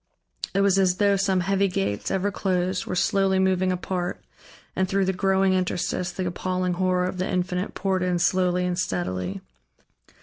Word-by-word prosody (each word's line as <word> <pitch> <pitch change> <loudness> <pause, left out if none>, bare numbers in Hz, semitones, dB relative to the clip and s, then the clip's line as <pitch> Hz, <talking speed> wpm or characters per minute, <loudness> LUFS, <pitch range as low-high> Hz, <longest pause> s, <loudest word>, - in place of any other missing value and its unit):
It 195 - +3
was 195 -1 +3
as 185 -2 +3
though 200 -1 +3
some 190 -1 +1
heavy 195 +2 +1
gates, 185 - -2
ever 195 +2 0
closed, 185 -1 -1
were - - -2
slowly 195 +1 +2
moving 185 -1 +2
apart, 180 0 -3 0.6
and 190 0 +1
through 195 -1 +1
the 190 - 0
growing 190 0 +2
interstice 180 -1 -1
the 185 +1 -4
appalling 180 +1 -1
horror 180 0 +1
of 185 0 -4
the 185 - -1
Infinite 180 +1 -2
poured 190 -2 0
in 180 -1 +1
slowly 180 0 +1
and 180 0 -1
steadily. 90 - -2
185 Hz, 170 wpm, -25 LUFS, 180-190 Hz, 0.6 s, It